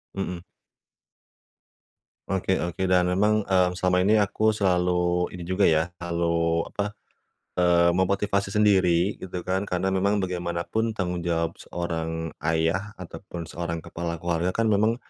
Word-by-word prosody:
Mhm. 95 Hz, -2 st, -3 dB, 1.9 s
Oke 95 Hz, 0 st, +1 dB
oke, 90 Hz, +2 st, -2 dB
dan 90 Hz, -1 st, +4 dB
memang, 105 Hz, +4 st, +2 dB
mmm, 90 Hz, -2 st, +2 dB
selama 90 Hz, 0 st, +2 dB
ini 105 Hz, +4 st, +4 dB
aku 105 Hz, +1 st, +2 dB
selalu 90 Hz, -3 st, +1 dB
ini 90 Hz, -2 st, -8 dB
juga 95 Hz, +3 st, -2 dB
ya, 80 Hz, +2 st, +1 dB
kalu 85 Hz, -1 st, 0 dB
apa, 105 Hz, +1 st, -3 dB, 0.6 s
eee, 85 Hz, -1 st, +4 dB
memotivasi 100 Hz, +2 st, +1 dB
sendiri 95 Hz, -3 st, +3 dB
gitu 90 Hz, -2 st, -6 dB
kan. 95 Hz, +2 st, -1 dB
Karena 95 Hz, +1 st, 0 dB
memang 100 Hz, +2 st, +2 dB
bagaimanapun 90 Hz, +5 st, -2 dB
tanggung 90 Hz, -3 st, -2 dB
jawab 85 Hz, -1 st, -1 dB
seorang 80 Hz, -2 st, -4 dB
ayah 80 Hz, +7 st, 0 dB
ataupun 85 Hz, -1 st, -8 dB
seorang 85 Hz, 0 st, -5 dB
kepala 85 Hz, 0 st, -4 dB
keluarga 85 Hz, +1 st, -1 dB
kan, 115 Hz, -1 st, +2 dB
memang 110 Hz, +3 st, +3 dB
90 Hz, 130 wpm, -25 LUFS, 85-100 Hz, 1.9 s, dan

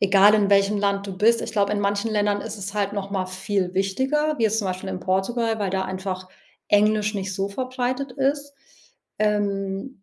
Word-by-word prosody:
egal 200 Hz, +1 st, +6 dB
in 205 Hz, -2 st, +3 dB
welchem 200 Hz, +1 st, +4 dB
Land 200 Hz, 0 st, 0 dB
du 190 Hz, -, -6 dB
bist, 230 Hz, +4 st, +4 dB
ich -, -, -4 dB
glaube, 205 Hz, -1 st, +1 dB
in 205 Hz, -, 0 dB
manchen 200 Hz, +2 st, 0 dB
Ländern 205 Hz, -1 st, +1 dB
ist 220 Hz, 0 st, -6 dB
es 200 Hz, -1 st, -6 dB
halt 205 Hz, -1 st, 0 dB
noch 200 Hz, -1 st, -4 dB
mal 190 Hz, -2 st, -1 dB
viel 185 Hz, 0 st, -2 dB
wichtiger, 265 Hz, +11 st, 0 dB
wie 230 Hz, -, +2 dB
jetzt 220 Hz, 0 st, +2 dB
zum 205 Hz, -, -1 dB
Beispiel 185 Hz, +1 st, -4 dB
in 185 Hz, -, -5 dB
Portugal, 225 Hz, +5 st, 0 dB
weil 200 Hz, -3 st, -1 dB
da 190 Hz, 0 st, 0 dB
einfach 185 Hz, 0 st, -5 dB, 0.4 s
Englisch 210 Hz, +1 st, +3 dB
nicht 190 Hz, -1 st, -3 dB
so 195 Hz, +1 st, -1 dB
verbreitet 255 Hz, +3 st, -3 dB
ist, 280 Hz, +1 st, -1 dB, 0.7 s
ähm, 200 Hz, +2 st, -1 dB
205 Hz, 200 wpm, -23 LUFS, 195-225 Hz, 0.7 s, egal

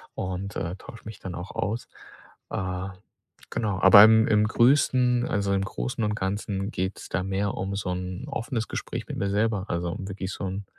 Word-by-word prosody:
und, 95 Hz, +2 st, -4 dB
äh, 85 Hz, +2 st, -3 dB
tausche 115 Hz, +3 st, -12 dB
mich 110 Hz, -1 st, -8 dB
dann 90 Hz, -2 st, -6 dB
auch 90 Hz, +2 st, -7 dB
aus. 110 Hz, +3 st, -3 dB, 0.6 s
Äh, 95 Hz, 0 st, -3 dB, 0.6 s
genau. 105 Hz, -4 st, -1 dB
Aber 100 Hz, +2 st, +10 dB
im 110 Hz, 0 st, +6 dB
im 105 Hz, 0 st, +4 dB
Größten, 125 Hz, 0 st, +3 dB
also 100 Hz, -1 st, 0 dB
im 95 Hz, 0 st, +1 dB
Großen 65 Hz, -, -3 dB
und 105 Hz, 0 st, 0 dB
Ganzen 100 Hz, 0 st, -2 dB
geht's 95 Hz, -1 st, -3 dB
da 95 Hz, -, -1 dB
mehr 95 Hz, +1 st, -1 dB
um 95 Hz, +1 st, -3 dB
so 95 Hz, -2 st, -2 dB
'n 90 Hz, +5 st, -4 dB
offenes 120 Hz, -4 st, -3 dB
Gespräch -, -, -5 dB
mit -, -, -5 dB
mir 100 Hz, -, -1 dB
selber, 105 Hz, -1 st, +1 dB
also 85 Hz, 0 st, -2 dB
wirklich 95 Hz, 0 st, -5 dB
so -, -, -6 dB
'n 95 Hz, +2 st, -4 dB
100 Hz, 185 wpm, -26 LUFS, 95-110 Hz, 0.6 s, Aber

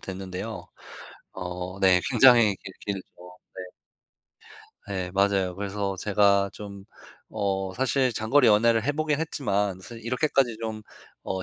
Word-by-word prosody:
됐는데요. 95 Hz, +1 st, -7 dB, 0.7 s
어 90 Hz, +1 st, -6 dB
네. 95 Hz, -2 st, +5 dB
굉장히 120 Hz, -5 st, +6 dB
길 95 Hz, -, -11 dB
길죠. 100 Hz, -2 st, -4 dB, 0.5 s
네. 95 Hz, -, -7 dB, 1.3 s
예 90 Hz, -2 st, -3 dB
맞아요. 100 Hz, -2 st, +1 dB
그래서 100 Hz, -1 st, -3 dB
제가 100 Hz, 0 st, +2 dB
좀 100 Hz, -1 st, -10 dB, 0.5 s
어 95 Hz, -3 st, -2 dB
사실 130 Hz, +1 st, +1 dB
장거리 120 Hz, +4 st, +2 dB
연애를 115 Hz, +1 st, +4 dB
해 145 Hz, -, +3 dB
보긴 155 Hz, 0 st, -1 dB
했지만 100 Hz, -, -1 dB
사실 115 Hz, +4 st, -11 dB
이렇게까지 125 Hz, -1 st, 0 dB
좀 110 Hz, -1 st, -4 dB, 0.4 s
어 95 Hz, 0 st, -3 dB
100 Hz, 245 characters per minute, -26 LUFS, 95-115 Hz, 1.3 s, 굉장히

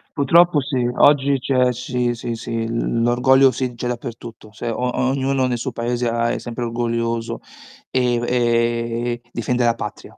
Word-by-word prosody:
Purtroppo 165 Hz, +2 st, +4 dB
sì, 130 Hz, -3 st, -1 dB
oggi 140 Hz, -1 st, +4 dB
c'è 125 Hz, -1 st, +2 dB
sì, 125 Hz, 0 st, -2 dB
sì, 115 Hz, 0 st, -4 dB
sì, 115 Hz, 0 st, -4 dB
l 115 Hz, 0 st, -1 dB
l'orgoglio 130 Hz, +3 st, +4 dB
sì, 125 Hz, -2 st, -3 dB
c'è 120 Hz, +1 st, -4 dB
dappertutto. 120 Hz, -2 st, -7 dB
Se 115 Hz, -, -5 dB
o 125 Hz, +2 st, -1 dB
ognuno 135 Hz, 0 st, +1 dB
ne 125 Hz, -1 st, -1 dB
suo 125 Hz, 0 st, -4 dB
Paese 120 Hz, +1 st, -2 dB
ha 115 Hz, 0 st, 0 dB
è -, -, -2 dB
sempre 120 Hz, 0 st, -5 dB
orgoglioso, 115 Hz, -1 st, -2 dB, 0.5 s
ehm, 120 Hz, -2 st, +1 dB
e 120 Hz, 0 st, 0 dB
difende 120 Hz, +1 st, 0 dB
la 115 Hz, -, +3 dB
patria, 105 Hz, -, -8 dB
120 Hz, 160 wpm, -20 LUFS, 115-130 Hz, 0.5 s, Purtroppo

